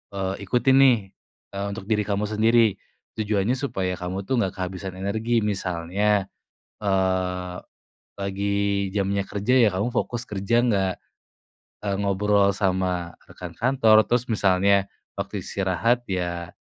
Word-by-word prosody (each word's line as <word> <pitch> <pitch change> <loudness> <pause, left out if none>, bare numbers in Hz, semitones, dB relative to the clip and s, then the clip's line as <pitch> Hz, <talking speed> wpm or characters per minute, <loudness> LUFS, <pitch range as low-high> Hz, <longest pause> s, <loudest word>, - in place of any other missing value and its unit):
eee, 95 0 -2
ikutin 125 +5 +3
nih, 130 -3 +6 0.5
eee, 100 0 -4
untuk 100 +1 -6
diri 105 +1 0
kamu 100 0 0
sendiri? 110 -1 +3 0.4
Tujuannya 105 +3 0
supaya 95 -9 -2
kamu 90 +2 -4
tuh 120 +6 0
nggak 95 -5 -1
kehabisan 95 0 -5
energi. 110 +4 -1
Misalnya, 100 +1 0 0.6
eee, 95 -2 -1 0.6
lagi 100 0 -1
jamnya 100 0 0
kerja 105 +5 -1
ya 120 -4 +6
kamu 100 +5 -1
fokus 120 0 -2
kerja, 105 +4 +1
nggak, 100 -6 +1 0.9
eee, 100 -1 0
ngobrol 100 0 +2
sama 90 -3 -1 0.2
rekan 90 -2 -9
kantor. 115 0 +4
Terus 120 0 +2
misalnya 100 -2 +2 0.2
waktu - - -4
istirahat 100 +6 0
ya, 85 -2 -3
100 Hz, 125 wpm, -24 LUFS, 95-110 Hz, 0.9 s, nih